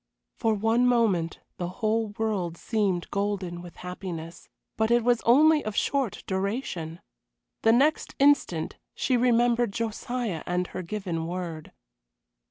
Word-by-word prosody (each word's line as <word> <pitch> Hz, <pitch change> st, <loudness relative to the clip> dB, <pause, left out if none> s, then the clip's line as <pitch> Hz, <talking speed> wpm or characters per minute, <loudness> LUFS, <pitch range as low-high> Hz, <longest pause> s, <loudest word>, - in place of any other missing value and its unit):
For 225 Hz, -2 st, +2 dB
one 225 Hz, +4 st, +2 dB
moment 210 Hz, -9 st, +1 dB, 0.2 s
the 175 Hz, -, -2 dB
whole 220 Hz, +3 st, 0 dB
world 195 Hz, -7 st, -1 dB
seemed 200 Hz, -5 st, -1 dB
golden 200 Hz, -4 st, -2 dB
with 175 Hz, -1 st, -11 dB
happiness; 175 Hz, -3 st, -7 dB, 0.3 s
but 220 Hz, 0 st, +1 dB
it 240 Hz, 0 st, +4 dB
was 240 Hz, -1 st, +3 dB
only 300 Hz, +5 st, +6 dB
of 215 Hz, -1 st, -4 dB
short 275 Hz, -6 st, 0 dB
duration. 190 Hz, -4 st, -3 dB, 0.6 s
The 225 Hz, -, +5 dB
next 290 Hz, +6 st, +2 dB
instant 275 Hz, -, +2 dB, 0.2 s
she 255 Hz, -, +1 dB
remembered 240 Hz, -1 st, +3 dB
Josiah 230 Hz, -3 st, -3 dB
and 180 Hz, +1 st, 0 dB
her -, -, -3 dB
given 175 Hz, -3 st, -3 dB
word. 170 Hz, -3 st, -5 dB
210 Hz, 130 wpm, -27 LUFS, 180-240 Hz, 0.6 s, only